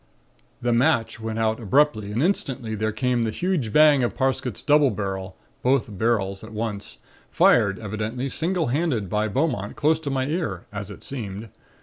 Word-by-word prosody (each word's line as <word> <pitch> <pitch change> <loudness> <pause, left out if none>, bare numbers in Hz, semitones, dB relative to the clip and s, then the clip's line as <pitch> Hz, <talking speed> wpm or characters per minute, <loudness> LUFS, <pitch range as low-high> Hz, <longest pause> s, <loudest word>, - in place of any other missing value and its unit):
"The 120 -1 +2
match 120 -2 +2
went 110 0 -4
out 110 0 +1
abruptly 110 -2 +2
and 115 +7 0
instantly 135 - -1
there 110 +1 -1
came 120 +2 0
the 115 - 0
huge 150 - -1
bang 150 +1 +6
of 120 - -1
Parsket's 130 -3 -1
double 145 -1 +5
barrel 95 -3 -4 0.2
(both 125 -5 +1
barrels 100 -3 0
at 110 - -10
once), 105 -2 -4 0.3
fired 100 -5 +4
evidently 110 +5 -3
single 165 +1 -1
handed 125 - 0
by 105 +1 +1
Beaumont 110 -4 -1
close 155 +1 +2
to 155 -3 -4
my 135 -1 0
ear, 150 - -3
as 100 0 -5
it 105 - -11
seemed. 110 -4 -6
115 Hz, 165 wpm, -24 LUFS, 105-140 Hz, 0.3 s, bang